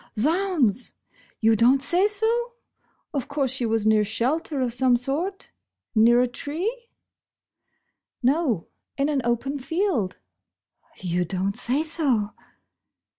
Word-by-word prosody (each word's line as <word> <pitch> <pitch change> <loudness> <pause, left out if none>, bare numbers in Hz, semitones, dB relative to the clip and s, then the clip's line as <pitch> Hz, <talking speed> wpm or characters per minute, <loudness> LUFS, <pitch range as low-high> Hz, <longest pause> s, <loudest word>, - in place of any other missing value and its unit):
" - - -47
Z'hounds! 300 - +1 0.5
You 225 0 +4
don't 245 +5 +4
say 350 +8 +2
so? 455 +3 -1 0.6
Of 275 -4 -2
course 280 -3 -1
she 260 -3 -2
was 220 -1 0
near 215 -1 +4
shelter 270 +8 -1
of 250 -2 -1
some 250 0 +3
sort? 320 +11 -4 0.4
Near 235 +2 +5
a 250 - +2
tree? 375 - -4 0.5
" - - -52
" - - -54
No, 260 - +1 0.3
in 280 +1 +1
an 285 -3 +1
open 240 +4 -1
field." 275 - -1 0.8
"You 180 -1 -1
don't 190 +3 -2
say 270 +6 -1
so?" 270 -10 +2
265 Hz, 130 wpm, -24 LUFS, 230-325 Hz, 0.8 s, Near